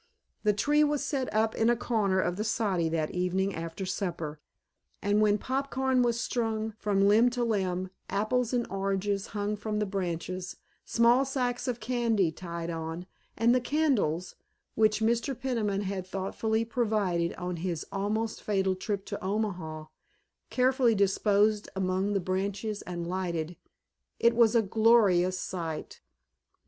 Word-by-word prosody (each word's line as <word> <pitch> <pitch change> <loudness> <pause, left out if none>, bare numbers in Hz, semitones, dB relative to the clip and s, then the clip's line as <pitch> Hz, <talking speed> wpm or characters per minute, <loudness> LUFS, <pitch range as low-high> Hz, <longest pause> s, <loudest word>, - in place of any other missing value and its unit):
The 210 - +3
tree 295 +9 +3
was 295 -1 +1
set 275 -3 -2
up 220 +1 +2
in 225 +1 +2
a 240 - +4
corner 210 -5 +1
of 175 -1 0
the 210 - -2
soddy 200 -7 0
that 160 -1 -1
evening 185 +2 0
after 165 +3 -5
supper, 170 -5 -3 0.6
and 205 +1 +2
when 210 -1 +4
pop 270 +4 -2
corn 265 -1 +1
was 235 -1 +1
strung 225 -2 -1
from 200 -1 +2
limb 225 +4 +5
to 245 0 -2
limb, 185 -5 -1 0.2
apples 225 +4 0
and 245 -2 +1
oranges 195 0 -1
hung 205 0 -2
from 210 +1 -3
the 210 - +1
branches, 185 -1 -4 0.3
small 235 +3 +4
sacks 250 -2 -2
of 245 -2 -1
candy 225 -6 +1
tied 170 0 -5
on, 165 +1 -5 0.3
and 230 +2 +4
the 255 - +3
candles, 240 - +1 0.4
which 215 0 +2
Mr. 235 +4 0
Peniman 215 -6 -1
had 190 -2 -4
thoughtfully 220 +4 -1
provided 210 -8 0
on 180 -1 -4
his 170 -1 -3
almost 215 +3 -2
fatal 190 -2 +1
trip 195 +1 -3
to - - -6
Omaha, 185 -6 -2 0.6
carefully 255 -2 +3
disposed 205 +1 +2
among 190 +1 0
the 200 - +2
branches 200 +3 -2
and 175 -1 -5
lighted, 175 -2 -3 0.6
it 235 0 +4
was 235 -1 +5
a 230 - +5
gorgeous 200 -4 +4
sight. 165 -5 -5
205 Hz, 150 wpm, -29 LUFS, 185-230 Hz, 0.6 s, limb